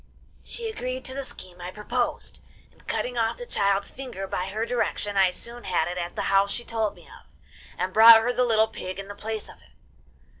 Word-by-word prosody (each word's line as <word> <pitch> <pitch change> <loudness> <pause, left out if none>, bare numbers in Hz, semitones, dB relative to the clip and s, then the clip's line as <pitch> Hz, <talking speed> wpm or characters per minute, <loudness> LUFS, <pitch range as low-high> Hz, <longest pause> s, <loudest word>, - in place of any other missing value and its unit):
'She 465 -1 -4
agreed 255 - -4
to 260 - -3
the 275 +1 -4
scheme 180 -8 -7
I 175 - -5
proposed, 240 +5 -2 0.3
and, - - -25
cutting 245 -1 -1
off 225 -1 +1
the 485 - -7
child's 200 - +1
finger, 250 -8 -6
by 185 -1 -3
her 215 +4 -2
direction 210 -4 -1
I 190 -1 +5
soon 235 +6 -6
had 175 -3 +1
it 180 +1 -3
at 175 0 -4
the - - -2
house 195 0 +3
she 240 - -1
told 220 -2 -1
me - - -17
of, - - -15 0.5
and 185 0 -2
brought 225 +1 +10
her 230 +2 +1
the 250 - +2
little 220 -2 +3
pig 185 -4 -6
in 195 0 -7
the - - -5
place 215 +1 -5
of - - -12
it. - - -21
220 Hz, 220 wpm, -26 LUFS, 195-245 Hz, 0.5 s, brought